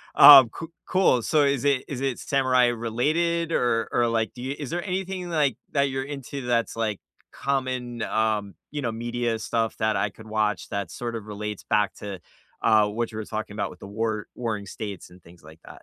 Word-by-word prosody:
Um, 135 -5 +11
coo 165 +6 -8 0.2
cool, 185 -10 +3
so 150 +5 +2
is 140 -2 +1
it 140 -2 +2
is 135 -2 -5
it 135 -3 -1
samurai-related, 130 +6 +1
or 115 -4 +1
or, 120 -1 +2
like, 115 -1 0
do 125 - -10
you 135 +2 -3
is 145 -2 -6
there 175 0 -2
anything, 185 -1 -3
like, 145 -7 +1 0.2
that 140 -1 +3
you're 135 0 -2
into 140 -1 -6
that's, 115 -2 0
like, 110 -3 -1 0.3
common, 130 -3 -2
um, 105 -4 0 0.2
you 145 -1 -3
know, 115 -3 -1
media 120 0 -2
stuff 115 0 -1
that 110 0 +1
I 100 +1 +1
could 110 +3 -14
watch 105 -2 -1
that 100 -4 -3
sort 120 -1 -5
of 110 -2 -6
relates 105 -1 -5
back 105 -1 +1
to, 100 -3 -7 0.4
uh, 110 -2 +5
what 115 +3 -3
you 110 - -7
were 110 - -5
talking 110 -1 -5
about 100 -3 -2
with 90 - -13
the - - -9
war 110 +1 -2
warring 110 -4 -3
states, 100 -1 -7
and 90 0 -16
things 85 -1 -18
like 80 +1 -14
that? - - -14
115 Hz, 205 wpm, -25 LUFS, 105-135 Hz, 0.4 s, Um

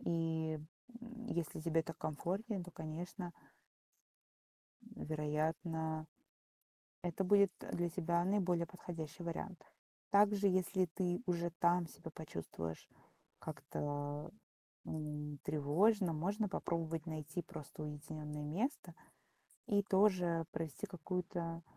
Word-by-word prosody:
И, 160 -2 +1 0.4
м, 235 -1 -8
если 170 -8 -1
тебе 165 0 +3
так 165 0 -6
комфортнее, 190 +6 -1
то, 180 - -8
конечно. 175 +3 -4 1.6
Вероятно, 155 +1 0 1.0
это 175 +2 0
будет 200 0 +6 0.2
для 175 0 +2
тебя 170 0 +2
наиболее 180 -3 +3
подходящий 170 -2 -6
вариант. 170 +2 -3 0.5
Также, 200 0 +6
если 185 0 +3
ты 175 +3 0
уже 170 -1 +1
там 175 0 +5
себя 160 - -9
почувствуешь 85 - -5 0.5
как-то, 145 0 -3 0.6
м, 150 -2 -3
тревожно, 170 +6 +4
можно 200 +7 +1
попробовать 165 -3 -1
найти 155 +2 -3
просто 155 -1 -7
уединённое 150 0 -4
место 210 - -1 0.7
и 205 -1 +4
тоже 185 -4 +4
провести 160 -4 -3
какую-то, 175 -1 -2
170 Hz, 100 wpm, -38 LUFS, 155-185 Hz, 1.6 s, будет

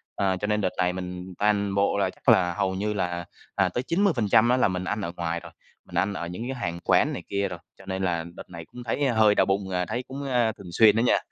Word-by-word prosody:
À, 95 -2 +1
cho 105 - -3
nên 105 0 +1
đợt 95 - +1
này 90 -1 +1
mình 90 0 -6
toàn 100 -1 +1
bộ 100 0 +2
là 100 - +1
chắc - - -2
là 90 -1 +5
hầu 95 0 -1
như 105 +2 -1
là, 90 -3 -2 0.3
à, 95 -2 +2
tới 120 +8 -2
90% 120 - +3
á 125 - +4
là 125 - +4
mình 90 -1 -2
ăn 105 +3 -2
ở 85 -3 -3
ngoài 85 0 -2
rồi, 85 -1 -12 0.3
mình - - -12
ăn 100 +1 +1
ở 85 -3 -4
những 90 +7 -6
cái 135 - -3
hàng 85 -7 -3
quán - - +3
này - - -6
kia 100 0 0
rồi, 90 -2 -7 0.2
cho 95 - -15
nên 95 0 -3
là 85 -3 0
đợt - - -10
này 85 -2 -9
cũng 125 +8 -11
thấy 120 +5 -1
hơi 110 -3 +4
đau - - +4
bụng, 95 0 -1
à, 90 -1 -1
thấy 125 +7 -3
cũng, 135 +2 -6
a, 120 -3 +3
thường 100 -5 -11
xuyên 105 +3 +6
đó 115 - +2
nha. 120 - +4
100 Hz, 275 wpm, -26 LUFS, 90-110 Hz, 0.3 s, xuyên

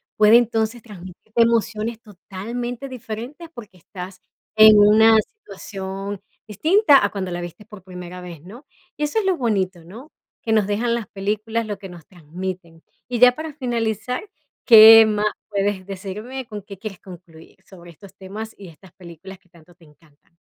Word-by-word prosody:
puede 215 +2 +6
entonces 230 0 -1
transmitirte 205 +2 -5
emociones 230 0 0
totalmente 235 +6 -7
diferentes, 255 +6 -8
porque 210 -6 -12
estás 180 +1 -10 0.3
en 215 -1 +8
una 220 +2 +6
situación 200 - -7 0.3
distinta 310 - +3
a - - 0
cuando 190 -3 -4
la 175 - -4
viste 175 +4 -10
por 210 -3 -14
primera 180 -1 -10
vez, 170 -4 -10
¿no? 225 - -14 0.3
Y 300 - -3
eso 295 +9 0
es 425 - -3
lo 380 -2 +2
bonito, 190 -7 -2
¿no?, 230 - -13 0.3
que 225 - -4
nos 215 -3 +3
dejan 230 +3 -1
las 230 -5 -3
películas, 215 +3 -3
lo 205 -2 -5
que 195 - -10
nos 170 -3 -13
transmiten. 175 0 -8 0.3
Y 245 - -2
ya 250 +1 +7
para 315 -1 -7
finalizar, 245 - -3 0.3
¿qué 225 -1 +9
más 210 0 -1 0.2
puedes 200 -1 -2
decirme? 210 +7 -7
¿Con 210 -2 -8
qué 200 0 -12
quieres 195 -2 -8
concluir 170 -3 -15
sobre 175 -3 -15
estos 185 +3 -16
temas 210 +4 -8
y 195 - -12
estas 175 +2 -17
películas 185 0 -13
que 180 - -34
tanto 170 0 -21
te 165 -1 -22
encantan? 150 +2 -27
210 Hz, 165 wpm, -21 LUFS, 185-230 Hz, 0.3 s, qué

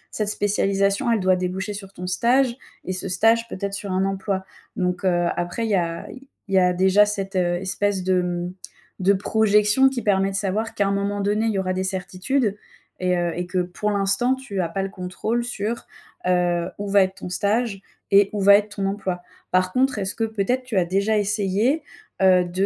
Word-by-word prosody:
Cette 215 -1 0
spécialisation, 200 +1 +1
elle 225 - +2
doit 185 -1 +3
déboucher 185 +3 -3
sur 195 -1 -8
ton 180 -2 -8
stage 240 +7 +2 0.3
et 185 - -2
ce 185 - -3
stage 225 +5 +3
peut-être 200 -2 -4
sur 200 -1 -4
un 190 +1 +1
emploi. 195 0 -2 0.3
Donc, 180 +1 -1
heu, 175 -1 +2
après 175 +6 -2
il - - -2
y - - +4
a 170 -2 -2 0.4
il 195 - -6
y - - +7
a 180 -1 +4
déjà 190 +3 +4
cette, 195 -2 -3
heu, 175 -1 +1
espèce 190 +1 -1
de, 185 0 +2
mmh, 175 0 -3 0.5
de 190 +2 +4
projection 210 +4 +3
qui 260 -2 -4
permet 195 -1 +2
de 195 - -5
savoir 205 +3 -2
qu'à 200 - +1
un 200 - 0
moment 200 +1 -1
donné, 205 +2 0
il - - +2
y 200 - -1
aura 185 -1 -1
des 185 0 -1
certitudes 190 +5 -1 0.4
et 180 -1 +1
heu 175 -1 -1
et 175 0 -3
que 185 +1 -3
pour 180 +4 -3
l'instant 200 +6 +1
tu 235 -8 -4
as 170 - -2
pas 195 +4 -2
le 195 - -3
contrôle 200 +5 -3
sur, 235 -1 -4 0.4
heu, 175 -1 +1
où 205 - -4
va 200 0 +5
être 190 0 -3
ton 180 - -7
stage 205 +2 0 0.3
et 200 0 +6
où 210 - -2
va 200 +1 +8
être 205 0 0
ton 195 - -1
emploi. 195 -3 -3 0.3
Par 185 0 +2
contre, 265 -1 +2
est-ce 195 -1 -2
que 225 - -2
peut-être 220 +4 -1
tu 245 -5 -3
as 180 - +3
déjà 200 +4 +1
essayé, 210 +7 +1 0.4
heu, 185 -1 +5
de, 180 +3 -1
195 Hz, 210 wpm, -23 LUFS, 185-210 Hz, 0.5 s, va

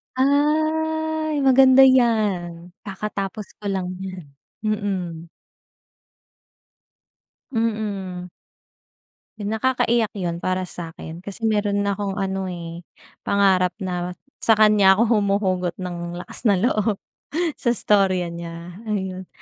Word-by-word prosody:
Ay 310 +3 +1
maganda 265 0 +7
'yan. 205 -9 +2 0.2
Kakatapos 200 +1 -5
ko 205 - -5
lang 185 -2 -2
niyan. 185 -4 -7 0.4
Mm. 190 -6 -2 2.3
Mm. 205 -5 -2 1.1
Yun, 205 0 -4
nakakaiyak 235 -1 +1
yun 175 -3 -3
para 185 +1 -1
sa'kin. 165 -2 -8
Kasi 200 +4 -8
meron 205 -2 +1
na 200 - +1
akong 200 -1 -3
ano, 195 -1 -2
eh, 170 -1 -6 0.5
pangarap 190 -2 +3
na 180 -1 -3 0.2
sa 225 - +4
kanya 210 -3 +6
ako 230 +2 +2
humuhugot 190 -3 0
ng 175 -2 -5
lakas 240 - -3
ng 195 -1 +3
loob. 215 -3 +2 0.6
Sa 240 -1 +1
storya 185 -5 +2
niya, 170 +2 -8
ayun. 190 -3 -3
200 Hz, 105 wpm, -22 LUFS, 180-220 Hz, 2.3 s, maganda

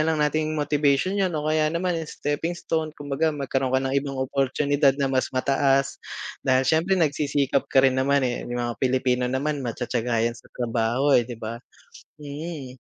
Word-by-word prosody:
lang 160 0 +2
nating 155 +1 0
motivation 150 +6 +1
yun 190 - +3
o 150 - -3
kaya 155 0 +2
naman, 175 +2 -1
eh, 165 -2 -3
stepping 160 +4 -2
stone. 160 -2 -2
Kumbaga 145 +2 -1
magkaroon 135 -1 -1
ka 130 - +2
ng 135 - -1
ibang 135 -1 -5
oportunidad 140 +1 +1
na 135 -2 0
mas 130 - +1
mataas 135 +1 +1 0.4
dahil 130 0 +2
siyempre 165 +7 +2
nagsisikap 145 -4 +1
ka 135 0 +4
rin 130 0 +3
naman, 140 0 +2
eh. 120 -1 -1
Yung 120 - -3
mga 120 -3 -4
Pilipino 125 -1 +1
naman 140 +3 -1
matiyatiyaga 120 -1 -1
'yan 115 - +1
sa - - -19
trabaho, 120 +3 +1
eh 120 -1 +4
di 120 - -6
ba? 115 +1 -6 0.6
Mm. 145 -2 -7
140 Hz, 175 wpm, -24 LUFS, 130-150 Hz, 0.6 s, ka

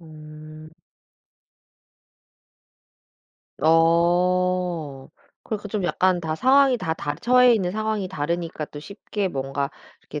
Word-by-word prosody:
음. 155 -1 -13 2.9
어 170 -2 +1 0.3
그 215 - -3
그 205 0 -9
좀 200 -3 -3
약간 180 0 +1
다 160 -1 -3
상황이 265 - +4
다 160 -8 -3
다 145 -2 -4
처해 250 +6 +4
있는 185 -5 -1
상황이 215 -2 -2
다르니까 165 -1 -3
또 145 - -10
쉽게 200 +2 -4
뭔가 140 -1 -3 0.3
이렇게 150 - -8
170 Hz, 190 characters per minute, -23 LUFS, 155-200 Hz, 2.9 s, 상황이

